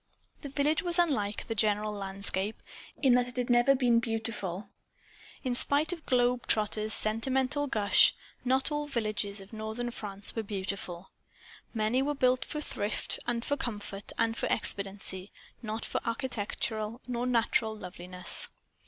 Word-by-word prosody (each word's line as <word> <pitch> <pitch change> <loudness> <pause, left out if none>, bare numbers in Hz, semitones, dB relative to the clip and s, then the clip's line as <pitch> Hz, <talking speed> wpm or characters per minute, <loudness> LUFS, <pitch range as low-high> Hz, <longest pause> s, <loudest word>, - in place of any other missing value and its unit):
The 285 - -6
village 295 +5 +1
was 350 -2 +7
unlike 265 -12 +1
the - - -1
general 210 0 +1
landscape, 195 +1 -2 0.4
in 260 -3 +6
that 245 0 +3
it 250 - -10
had 245 0 0
never 240 +3 +5
been 245 -3 +4
beautiful. 220 -5 -3 0.8
In 255 -2 0
spite 290 +6 +3
of 335 -3 -10
globe 245 -1 +2
trotters' 215 0 +2
sentimental 260 +6 +1
gush, 210 -5 +5 0.3
not 260 +3 +3
all 295 0 -1
villages 215 -5 -1
of 195 +3 -14
northern 220 +3 -3
France 200 -3 -3
were 225 - 0
beautiful. 195 -3 -5 0.6
Many 225 +3 +1
were 290 +2 0
built 255 -1 +3
for 300 - -4
thrift 210 -7 -2
and 235 0 -1
for 285 - +1
comfort 205 -5 -4
and 225 0 +1
for - - -1
expediency; 195 -2 -1 0.3
not 220 -1 -4
for - - -2
architectural 230 -1 -3
or 240 +1 -1
natural 230 -2 +1
loveliness. 180 -1 -2
225 Hz, 145 wpm, -30 LUFS, 205-255 Hz, 0.8 s, was